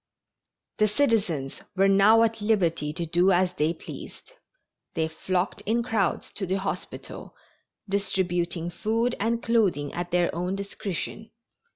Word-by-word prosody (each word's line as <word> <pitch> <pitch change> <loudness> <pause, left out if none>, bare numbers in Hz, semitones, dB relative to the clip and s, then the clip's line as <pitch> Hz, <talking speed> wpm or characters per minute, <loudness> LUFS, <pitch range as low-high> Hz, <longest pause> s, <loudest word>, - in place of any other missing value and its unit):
The 215 - +5
citizens 200 - 0
were 195 +1 +4
now 200 +4 +6
at 225 -1 0
liberty 170 -8 +1
to 170 +2 -3
do 175 +4 +3
as 180 0 +3
they 155 -2 +1
pleased. 170 - -10 0.6
They 160 -1 +1
flocked 180 +4 -2
in 235 +2 +2
crowds 215 -6 -1
to 195 - -3
the 190 +2 +1
hospital, 195 0 -6 0.5
distributing 180 -3 -1
food 225 +6 0
and 230 +2 0
clothing 200 -11 +1
at 175 0 -3
their 175 0 +2
own 180 +3 -2
discretion. 200 +2 -5
190 Hz, 135 wpm, -26 LUFS, 175-215 Hz, 0.6 s, now